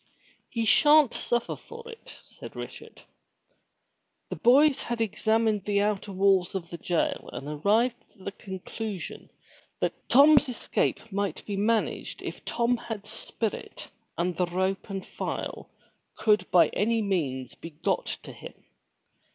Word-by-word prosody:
"He 230 -1 -1
sha'n't 295 +3 +6
suffer 240 -1 -1
for 465 0 -11
it," 460 -1 -11
said - - -11
Richard. - - -9 1.3
The - - -3
boys 275 +4 +5
had 240 -1 -3
examined 220 -1 +1
the 200 -1 +2
outer 205 -1 -1
walls 195 -1 +3
of 170 -3 -4
the 170 - -6
jail 175 -2 -1
and 140 - -7
arrived 210 +11 +2 0.2
at 190 - -16
the 200 - -2
conclusion 195 +1 -6 0.5
that - - 0 0.2
Tom's 285 +1 +7
escape 230 -2 -1
might 200 -3 -2
be 205 - -3
managed 215 +2 0
if - - -6
Tom 240 +1 +1
had 225 -3 -6
spirit 220 0 -5 0.3
and 175 +1 0
the 180 +1 +1
rope 190 +3 -1
and 195 -1 -4
file - - -5 0.5
could 210 -1 +2
by 170 -3 +6
any 225 +2 +1
means 140 - -1
be 165 - -9
got 150 - -1 0.2
to - - -9
him. - - -10
210 Hz, 140 wpm, -27 LUFS, 185-230 Hz, 1.3 s, Tom's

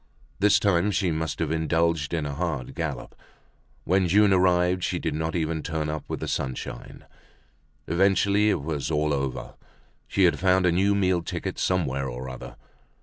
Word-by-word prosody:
This 105 +1 +5
time 100 -1 +2
she 95 -3 0
must 80 0 -2
have 80 -2 -2
indulged 80 -1 0
in 80 -3 -1
a 70 - -4
hard 75 -5 -3
gallop. - - -4 0.7
When 95 +1 +2
June 100 +2 +4
arrived 90 0 +2
she - - -1
did - - -2
not 80 +2 -2
even 80 -1 -1
turn 80 -2 -3
up 75 -1 -4
with - - -5
the - - -3
sunshine. 65 -1 -5 0.8
Evidently 100 +4 +3
it 85 - 0
was 75 -2 -3
all 75 -1 +1
over, 70 -2 -3 0.5
she 100 - +1
had 90 - +3
found 95 0 +3
a 90 - +4
new 100 +4 +2
meal 95 -3 +2
ticket - - -5
somewhere 70 -7 0
or 60 +2 -6
other. 65 - -9
85 Hz, 170 wpm, -25 LUFS, 75-95 Hz, 0.8 s, This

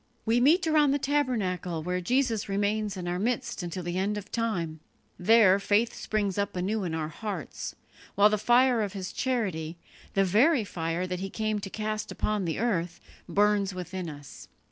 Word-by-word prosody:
We 230 +2 +3
meet 330 +8 +5
around 305 -2 +4
the - - +2
tabernacle 220 - -1
where 180 +2 -1
Jesus 230 0 0
remains 205 0 0
in 180 -1 -5
our 175 +1 -1
midst 230 -1 -1
until 175 +1 -5
the 175 +2 -2
end 205 +2 0
of 205 - -8
time; 175 -9 -2 0.4
there 200 0 +6
faith 210 +3 +2
springs 205 -3 -2
up 200 - -1
anew 195 +4 -1
in 165 -3 -2
our 155 -1 -2
hearts, 185 - -5 0.4
while 205 +1 +7
the 215 - +1
fire 245 +1 +4
of 205 -2 -2
His 190 -2 -5
charity 185 - -2 0.4
the 195 0 +4
very 235 - +4
fire 170 -2 -2
that 180 -1 -3
He 195 +1 -4
came 215 +1 -1
to 195 -1 -6
cast 215 +1 -3
upon 210 -3 -1
the 165 - -2
earth 180 -7 -1 0.3
burns 205 -2 +2
within 180 -1 -5
us. 145 -2 -11
200 Hz, 180 wpm, -28 LUFS, 180-225 Hz, 0.4 s, while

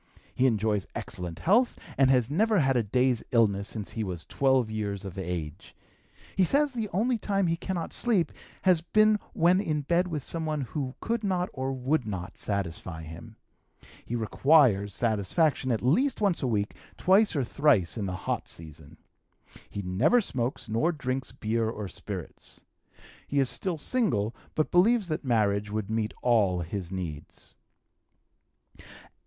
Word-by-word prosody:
He 130 - +3
enjoys 105 -4 0
excellent 85 -2 -5
health, 235 +7 +3 0.2
and 135 -1 +4
has 125 -4 +4
never 210 - +2
had 135 -3 +2
a 120 - +4
day's 125 +2 +1
illness 100 -4 +2
since 105 -3 -5
he 110 - -3
was 90 -4 -5
12 130 -4 +2
years 100 -2 -3
of 95 -2 -7
age. 90 -2 -5 0.6
He 190 - +4
says 285 +9 +2
the 225 -4 -3
only 230 +5 +1
time 195 -2 0
he 165 -1 +1
cannot 170 -1 -4
sleep 215 -8 +1 0.3
has 180 -4 +4
been 215 +4 +3
when 175 +3 +4
in 155 -6 -1
bed 170 +5 +1
with 155 -6 -4
some 165 -1 -4
one 155 -2 -1
who 135 0 -4
could 230 -1 -1
not 185 -3 0
or 130 0 -2
would 130 0 0
not 95 -3 -5
satisfy 85 -4 -4
him. 80 +1 -10 0.7
He 120 - -4
requires 115 -3 +3
satisfaction 120 - +1
at 115 - -1
least 235 - +2
once 200 -5 +1
a 135 - 0
week, 105 -3 0 0.2
twice 195 +1 +4
or 140 - +1
thrice 120 - +2
in 105 -4 -3
the 95 - -3
hot - - -2
season. 80 -1 -11 0.7
He 100 - -5
never 105 - +3
smokes, 130 - -3
nor 115 +11 +1
drinks 130 -4 -3
beer 110 0 -1
or 105 -3 -5
spirits. - - -8 0.7
He 140 - 0
is 135 -2 +2
still 185 -4 -2
single, 120 - 0 0.2
but 155 - 0
believes 200 +2 +4
that 155 - -2
marriage 105 -5 +1
would 105 0 -3
meet 110 -1 0
all 105 -7 +3
his 90 +1 -5
needs. 85 -6 -7
125 Hz, 160 wpm, -28 LUFS, 100-170 Hz, 0.7 s, and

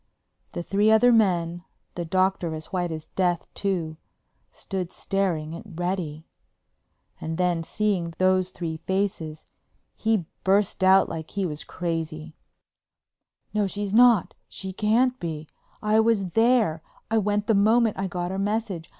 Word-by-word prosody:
The 175 - -4
three 205 +4 +2
other 220 +3 +6
men—the 175 -4 -1
Doctor 185 -1 0
as 155 +4 -9
white 175 -2 -1
as 155 -1 -6
death, 175 -3 0
too—stood 180 +1 -5
staring 170 -6 -2
at - - -7 0.2
Reddy. 175 -4 -3 1.0
And 160 0 -4
then, 180 -2 +1
seeing 180 -2 -1
those 185 0 +2
three 165 -3 -5
faces, 165 -3 -3 0.5
he 220 -6 0 0.2
burst 195 0 +2
out 190 +1 +6
like 160 -1 -6
he 200 -1 -2
was 150 -3 -4
crazy: 160 -2 -4 1.2
"No—she's 205 -1 -1
not—she 220 -4 +2
can't 240 +6 +2
be! 160 -2 -5 0.4
I 215 +1 +3
was 220 -5 +2
there; 225 -8 +3 0.3
I 225 - +4
went 205 0 0
the 225 - +2
moment 220 +1 +3
I 195 - -1
got 175 0 -3
her 190 - -3
message. 200 -4 -2
185 Hz, 130 wpm, -25 LUFS, 165-210 Hz, 1.2 s, other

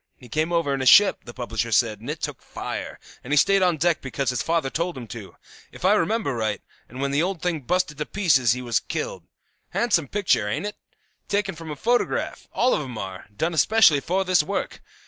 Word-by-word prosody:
He 125 - -15
came 155 +6 -1
over 165 -5 +1
in 135 - -2
a - - -1
ship, 205 +7 +6
the 120 - -8
publisher 115 -2 -3
said, 110 -2 +2
and 115 +5 -9
it 155 +1 -4
took - - -4
fire, - - -6 0.2
and 125 - -8
he 150 - +3
stayed 195 +6 +4
on 180 -3 +3
deck 170 +1 +1
because 135 0 -2
his 125 - -2
father 165 -5 0
told 170 -2 -2
him 125 - -7
to, 110 -5 -9 0.4
if - - -7
I - - +6
remember 200 -3 +1
right, 110 -3 -1 0.3
and 125 - -10
when 140 0 -1
the 140 +2 +2
old 180 -1 -2
thing 175 -3 0
busted 165 +1 -1
to 150 - -1
pieces 140 - +3
he 125 0 -5
was 120 -1 +1
killed. - - -5 0.4
Handsome 190 - +1
picture, 185 - +1
ain't 105 - -2
it? 210 - -4 0.5
Taken 200 -1 0
from 165 -1 -9
a 150 - -4
photograph; 240 +10 -1
all 255 - +2
of - - 0
'em 125 -5 -7
are; 95 -2 -7
done 165 +7 0
especially 165 -1 +5
for 185 +6 -1
this 185 -2 +4
work. 150 - -4
155 Hz, 225 wpm, -24 LUFS, 125-185 Hz, 0.5 s, ship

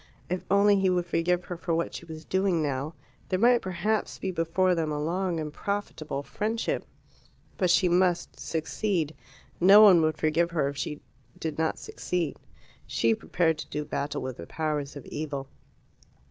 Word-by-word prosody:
If 180 - -1
only 200 0 +5
he 190 -1 +3
would 180 -1 +1
forgive 175 +1 +1
her 175 - -5
for 165 -1 -1
what 170 - -1
she - - -7
was 160 -1 -9
doing 190 -4 +1
now, 145 +3 -2 0.3
there 185 - +1
might 240 +4 +5
perhaps 210 +4 -1
be 190 - -3
before 180 +2 +1
them 160 -3 -1
a 150 - -2
long 175 +2 -1
and 150 -1 -4
profitable 160 -9 -3
friendship. 220 +8 -2 0.7
But 185 - +2
she 180 +1 +4
must 175 0 +1
succeed. 160 0 -1 0.5
No 195 +4 +8
one 185 -5 +8
would 155 -1 +1
forgive 160 +2 +2
her 155 -5 0
if 140 - -7
she 145 +2 -4 0.4
did 160 -1 -4
not 160 0 +1
succeed. 175 -5 -3 0.5
She 115 0 +2
prepared 160 +7 0
to - - -7
do 150 0 -3
battle 145 0 -3
with 130 -1 -5
the 85 - -9
powers 150 -3 -2
of 140 - -9
evil. 145 -3 -4
165 Hz, 175 wpm, -27 LUFS, 150-185 Hz, 0.7 s, No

